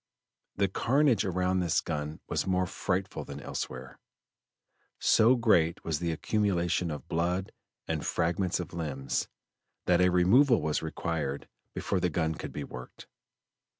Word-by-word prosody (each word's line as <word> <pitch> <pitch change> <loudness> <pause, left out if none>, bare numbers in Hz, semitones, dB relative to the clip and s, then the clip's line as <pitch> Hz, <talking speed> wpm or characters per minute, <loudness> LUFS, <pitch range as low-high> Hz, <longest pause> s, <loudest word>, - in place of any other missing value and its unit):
The 100 0 +2
carnage 125 +3 +2
around 90 0 +1
this 85 -3 +2
gun 75 -1 -4
was - - -1
more 95 0 +2
frightful 95 +1 -2
than - - -8
elsewhere; 65 +1 -6 1.0
so 115 +4 +5
great 90 -8 +2
was 80 -3 -1
the 85 -1 -1
accumulation 90 -2 0
of 75 -4 -6
blood 90 +3 -1 0.4
and - - -2
fragments 85 +2 0
of 90 - -6
limbs, 70 -5 -2 0.6
that 90 0 +4
a 90 - +5
removal 110 +9 +5
was 75 -1 -1
required 80 -3 -3 0.3
before 95 - -1
the 90 0 +1
gun 80 -1 0
could - - -7
be 75 - -5
worked. 60 -2 -10
90 Hz, 140 wpm, -29 LUFS, 80-95 Hz, 1.0 s, so